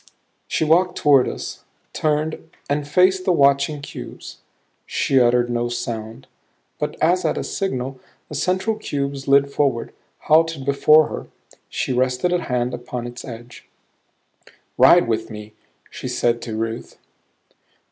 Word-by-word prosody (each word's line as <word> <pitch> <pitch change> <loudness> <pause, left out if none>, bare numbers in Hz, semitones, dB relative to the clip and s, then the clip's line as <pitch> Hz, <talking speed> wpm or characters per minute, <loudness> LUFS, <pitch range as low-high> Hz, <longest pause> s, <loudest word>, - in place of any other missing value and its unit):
She - - 0
walked 180 +4 +3
toward 140 -3 +4
us, - - -7 0.3
turned 155 +1 -1 0.2
and 145 0 -1
faced 185 +4 +3
the 185 - +2
watching 140 -1 +3
cubes. - - -9 0.5
She 135 - +2
uttered 120 0 +3
no 120 0 -1
sound, 115 -2 -5 0.5
but - - -2
as 180 +3 +3
at - - 0
a - - -2
signal 130 -9 -3 0.3
the - - -10
central 185 +8 0
cube 140 -8 -3
slid 140 +1 +2
forward, 140 -5 0 0.3
halted 160 -2 +2
before 150 +2 +5
her. - - -6 0.4
She 130 - -2
rested 130 +7 +1
a 175 - +1
hand 125 -1 -1
upon 120 0 -5
its 120 0 -8
edge. 120 -1 -11 1.1
"Ride 175 -7 +6
with 115 -1 -1
me," 105 -1 -9 0.4
she - - -6
said 120 0 0
to 110 -2 -5
Ruth. 115 +1 -4
140 Hz, 135 wpm, -21 LUFS, 120-155 Hz, 1.1 s, Ride